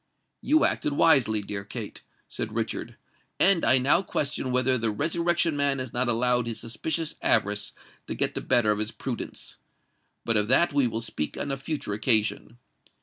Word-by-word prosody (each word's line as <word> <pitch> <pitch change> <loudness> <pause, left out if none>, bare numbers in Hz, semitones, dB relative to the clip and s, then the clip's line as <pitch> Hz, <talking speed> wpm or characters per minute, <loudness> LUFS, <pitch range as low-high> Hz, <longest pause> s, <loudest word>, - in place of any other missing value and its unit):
"You 310 +1 +3
acted 145 - -1
wisely, 135 -9 +4
dear 100 0 -5
Kate," - - -7 0.3
said - - -6
Richard; - - -4 0.4
"and 195 -4 +4
I 130 - +6
now 135 +7 +3
question 140 -7 -3
whether 130 +1 +2
the 115 -2 0
Resurrection 170 +7 0
Man 140 -1 +2
has 130 -2 -5
not 125 +1 +1
allowed 120 0 +1
his 115 - -4
suspicious 155 +7 -3
avarice 105 0 +1 0.4
to - - -5
get - - -1
the - - -4
better 110 -3 +2
of 105 - -1
his 105 0 -1
prudence. 120 +1 -6 0.7
But 115 -2 +2
of 105 0 0
that 145 +7 +3
we 140 -3 +2
will 115 0 -4
speak 105 -9 -4
on 140 - -3
a - - -1
future 140 -5 -5
occasion. 110 +1 +2
125 Hz, 175 wpm, -26 LUFS, 110-145 Hz, 0.7 s, I